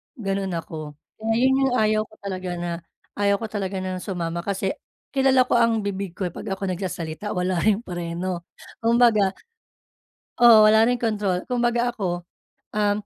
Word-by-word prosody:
ganon 195 -5 -2
ako. 155 -3 -6 0.2
Kaya 225 +1 0
yun 260 +2 +4
yung 250 - 0
ayaw 215 -2 +3
ko 215 - -19
talaga 185 -2 -4
na, 175 0 -3 0.5
ayaw 200 0 +3
ko 225 - -4
talaga 195 -2 -3
na 185 -1 -3
sumama 170 -3 -3
kasi 195 +1 -1 0.4
kilala 265 -2 +4
ko - - +2
ang 230 -2 +2
bibig 195 -3 -4
ko 195 - -4
eh, 175 - -7
'pag - - -8
ako 195 +1 -5
nagsasalita 180 +1 -4
wala 180 -1 0
ring 215 +1 +2
preno. 175 -1 -4 0.3
Kumbaga 230 -4 +4 1.1
oo, 220 -3 +9
wala 220 +1 +6
ring 245 -1 +1
kontrol. 205 -5 0
Kumbaga, 240 -1 +1
ako, 180 -6 -3 0.5
um 205 -1 +2
200 Hz, 160 wpm, -24 LUFS, 180-225 Hz, 1.1 s, oo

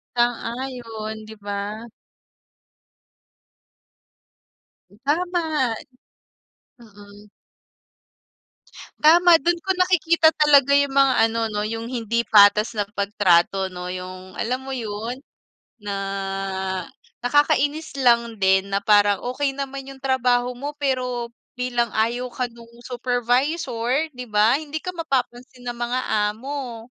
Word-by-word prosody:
Sang-ayon 235 -2 -3
di 220 - -9
ba? 205 +3 -5 3.0
Hmm, 200 - -20
tama. 315 -5 0 1.1
Mm. 205 -2 -16 1.7
Tama 335 +1 +6
dun 345 +4 +1
ko 380 - -11
nakikita 340 -3 +3
talaga 280 -2 +5
yung 280 -1 +1
mga 275 -1 +4
ano 225 0 -1
no 210 0 -2
yung 225 +1 -4
hindi 235 -2 -1
patas 210 +2 +5
na 205 - +1
pag-trato 190 -1 +2
no, 180 0 -6
yung 185 0 -8
alam 255 +3 -2
mo 265 - -9
yun? 225 +1 -4 0.6
Na 205 -1 -4 1.3
nakakainis 290 +2 +1
lang 235 -3 +3
din 190 +1 +3
na 200 - +1
parang 205 -1 +4
okey 275 0 -1
naman 275 -1 -5
yung 270 -1 -12
trabaho 250 -2 +1
mo 290 +3 -5
pero, 250 -4 -2 0.3
bilang 245 -1 0
ayaw 240 +3 0
ka 250 -1 -2
nung 235 0 -15 0.2
supervisor 245 +1 -1 0.3
di 250 - -6
ba? 215 +5 +4
Hindi 310 +1 -5
ka - - -4
mapapansin 255 -5 -3
ng 240 0 -4
mga 240 +1 -1 0.3
amo. 250 -1 -6
245 Hz, 110 wpm, -22 LUFS, 220-275 Hz, 3.0 s, Tama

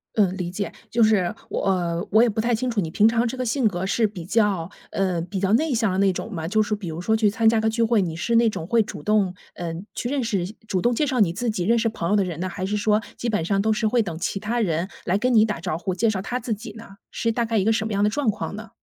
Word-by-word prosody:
嗯， 195 -4 +2
理 175 -2 -3
解。 200 +2 -3 0.2
就 230 0 +3
是， 205 -5 +3 0.2
我 - - -2
呃 175 -2 -1
我 220 +2 +6
也 240 - +4
不 220 - -3
太 235 +2 +1
清 250 +3 0
楚 230 -3 -1
你 165 -5 -1
平 210 +5 +4
常 230 +1 +2
这 240 - -4
个 255 - -1
性 240 +1 +2
格 180 -3 -2
是 220 +4 +2
比 195 -5 -8
较， 200 -4 +1 0.2
呃， 185 -3 0
比 185 +3 -4
较 195 0 +1
内 305 +4 +2
向 225 -4 +1
的 185 - -1
那 195 0 +4
种 220 - -5
吗？ 160 -4 -4
就 215 +5 +2
是 210 0 0
比 205 -4 -7
如 160 +2 -5
说 220 +4 +2
去 220 -2 +3
参 225 +1 +1
加 225 0 +2
个 220 - +1
聚 230 +1 -1
会， 230 -1 +3
你 165 -3 -2
是 230 +7 -1
那 230 0 +5
种 165 -6 -5
会 230 +3 +3
主 210 - -8
动， 210 -4 +2 0.2
呃， 170 -2 -4 0.2
去 245 - -3
认 280 -2 0
识， 200 -6 -1 0.2
主 185 -3 0
动 240 0 +2
介 300 - +1
绍 260 -2 0
你 180 -6 +3
自 240 +5 -2
己 200 -5 -1
认 235 +3 +3
识 225 0 +1
朋 180 -6 -3
友 210 - +4
的 200 - +3
人 175 -4 -5
呢， 185 - -2
还 185 - -6
是 210 +2 -1
说 210 +1 +2 0.2
基 240 - -3
本 210 -7 0
上 195 +3 0
都 220 +1 +2
是 220 0 0
会 240 +2 +3
等 175 -5 -5
其 190 +2 -2
他 230 +4 -2
人 170 -3 0 0.2
来 180 +2 +2
跟 250 +4 +1
你 220 -2 +6
打 210 -6 -3
招 175 -2 -2
呼， 185 0 -2
介 230 +5 +1
绍 190 -3 -3
他 245 +6 -3
自 230 -1 -2
己 215 +1 -8
呢？ 225 +1 -10 0.3
是 230 - 0
大 235 +1 0
概 225 0 0
一 195 - +2
个 220 - +3
什 220 0 -1
么 215 - -4
样 200 - +1
的 210 - +4
状 275 0 0
况 210 -1 -3
呢？ 220 +1 -9
210 Hz, 335 characters per minute, -23 LUFS, 185-230 Hz, 0.3 s, 我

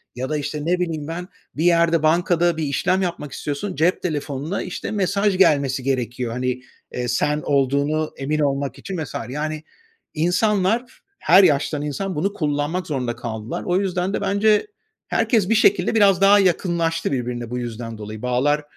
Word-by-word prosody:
Ya 130 +2 -4
da, 155 - 0
işte, 145 +1 -4
ne 180 +2 +1
bileyim, 160 -4 -2
ben 175 +2 -5 0.3
bir 155 - -1
yerde 170 -2 +3
bankada 170 +1 +2
bir 160 - -2
işlem 180 +6 +1
yapmak 170 -6 -3
istiyorsun. 150 +9 -4
Cep 165 +5 +1
telefonuna, 150 +1 -3
işte, 185 - -5
mesaj 200 -1 +1
gelmesi 140 -7 +3
gerekiyor. 125 -2 -2
Hani, 125 +1 -2 0.3
eee, 125 0 -3
sen 150 +5 0
olduğunu 140 +3 +1
emin 150 +3 -2
olmak 140 -1 -1
için 190 -1 -6
vs. 140 - -9
Yani 155 +3 -4 0.5
insanlar, 200 +8 0 0.2
her 195 - +6
yaştan 150 -2 +2
insan 175 +6 -3
bunu 195 +7 -1
kullanmak 150 +2 -2
zorunda 125 -5 -2
kaldılar. 110 -1 -5
O 180 +1 +1
yüzden 185 -1 -1
de - - -1
bence 210 - +2 0.4
herkes 215 -5 +1
bir 225 - +3
şekilde 200 -1 +3
biraz 200 -4 +4
daha 200 +1 +7
yakınlaştı 170 -3 +1
birbirine 120 -3 -3
bu 125 - -3
yüzden 115 -1 -6
dolayı. 105 0 -8
Bağlar 135 +4 +1
155 Hz, 165 wpm, -22 LUFS, 135-185 Hz, 0.5 s, daha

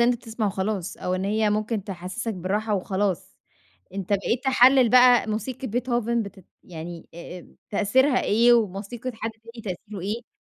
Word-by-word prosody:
أنت 240 0 -6
تسمع 225 -1 -2
وخلاص 195 -1 -2
أو 180 - -2
إن 185 - -2
هي 215 +1 +1
ممكن 215 -1 -1
تحسِّسك 195 +4 -5
بالراحة 205 +4 -1
وخلاص، 195 -1 -2 0.6
أنت 195 -2 -5
بقيت 230 +6 0
تحلّل 265 -1 +6
بقى 245 0 +6
موسيقة 230 +5 -3
beethoven 240 0 0
بتت 200 -2 -11 0.2
يعني 170 0 -8
أ 170 +1 -8
أم - - -19
تأثيرها 255 +7 +3
إيه، 235 +3 +4
وموسيقة 225 +3 -2
حد 225 0 -4
تاني 230 +1 -13
تأثيره 205 +1 -9
إيه؟ 215 +5 -6
215 Hz, 155 wpm, -25 LUFS, 195-240 Hz, 0.6 s, تحلّل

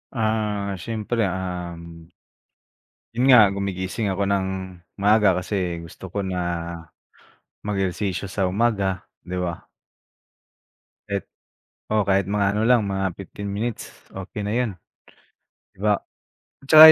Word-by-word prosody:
Ah, 105 -3 0
siyempre, 115 +3 -1
um 85 -3 -5 1.1
yun 125 +3 +2
nga 120 -5 +10
gumigising 100 +2 -2
ako 95 +1 0
ng 100 -1 +1 0.5
maaga 105 -2 +5
kasi 90 -2 -1
gusto 90 +3 -10
ko 100 +2 -2
na 95 -1 -2 1.2
mag-ehersisyo 95 -2 -1
sa 95 -1 0
umaga 100 -2 +1 0.2
di 90 +1 -6
ba? 90 -2 -3 1.4
It - - -1 0.6
oo 110 -1 +4
kahit 95 -1 +3
mga 105 -1 +2
ano 105 - +1
lang, 125 -2 +6
mga 95 0 -1
15 100 +2 -6
minutes, 110 +3 -3 0.2
okey 95 +2 -5
na 105 - -1
yun, 125 -3 +1 1.0
di - - -24
ba? 105 -1 +4 0.7
Tsaka 155 +2 +12
100 Hz, 115 wpm, -24 LUFS, 95-105 Hz, 1.4 s, Tsaka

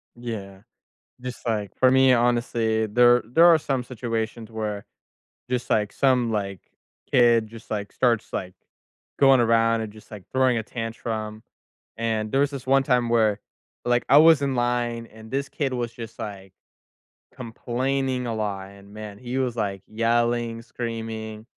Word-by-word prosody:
Yeah. 105 -5 -7 0.6
Just 125 -1 -7
like, 105 -4 -2
for 130 - +4
me, 130 0 +5
honestly, 120 -2 +1
there 120 +2 +4
there 145 +9 +4
are 170 -2 +8
some 135 -4 -2
situations 115 -2 -4
where 105 -2 -4 0.6
just, 125 -1 -2
like, 105 -2 +1
some, 125 -4 +2
like, 100 -4 -3 0.5
kid 120 -2 +4
just, 115 +1 -13
like, 100 -2 -3
starts, 120 -4 +1
like, 90 0 -3 0.7
going 135 -2 +6
around 115 0 +3
and 110 - -5
just, 110 0 -16
like, 105 -4 -10
throwing 130 -2 +3
a - - -3
tantrum, 110 -1 -5 0.5
and 110 -2 -1
there 135 - +3
was 145 - +1
this 135 -3 -7
one 135 +1 +4
time 125 -3 +1
where, 110 -3 +2 0.5
like, 120 0 +2
I 140 - +9
was 160 -2 +6
in 135 -1 0
line, 120 -1 -1
and 110 0 -14
this 140 +1 -2
kid 140 -3 -2
was 120 -2 -2
just, 115 -1 -9
like, 95 -2 -7 0.8
complaining 130 +1 -2
a 115 - -2
lot, 100 -3 -3
and, 100 0 -16
man, 105 -1 -8
he 125 +2 -4
was, 125 -3 -1
like, 100 -3 -2
yelling, 115 +1 0
screaming, 110 -2 -6
115 Hz, 160 wpm, -24 LUFS, 110-125 Hz, 0.8 s, I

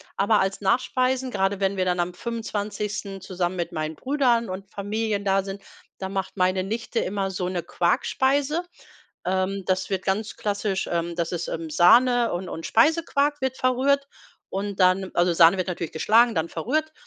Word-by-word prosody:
aber 205 +2 +3
als 195 +1 -1
Nachspeisen, 255 +4 +1
gerade 195 0 0
wenn 195 0 +1
wir 185 -1 0
dann 180 -1 0
am 175 +1 -1
25. 210 -2 -4
zusammen 185 -1 -2
mit 175 -1 -3
meinen 155 -1 -3
Brüdern 250 - +1
und 195 +1 -7
Familien 205 0 -2
da 195 0 +2
sind, 195 0 -7 0.3
da 190 - -4
macht 195 0 -4
meine 185 0 +2
Nichte 225 +3 -3
immer 195 0 -2
so 180 -1 -3
'ne 175 -3 -3
Quarkspeise. 270 - +1 0.6
Ähm, 190 +1 -1
das 185 0 0
wird 190 -1 -1
ganz 205 +3 -1
klassisch 205 -2 -2
ähm, 170 0 -1
das 170 -1 -2
ist, 175 -1 -3
ähm, 165 -1 -4
Sahne 235 +9 +5
und 180 +1 -4
und 165 - -6
Speisequark 290 +2 +2
wird 265 -1 -1
verrührt 275 +2 +2 0.4
und 200 +1 -4
dann 185 +1 +3
also, 175 0 +3
Sahne 170 +3 +6
wird 185 - -2
natürlich 170 -3 -4
geschlagen, 225 +7 +4
dann 160 +1 0
verrührt. 310 - -2
195 Hz, 170 wpm, -24 LUFS, 185-235 Hz, 0.6 s, Sahne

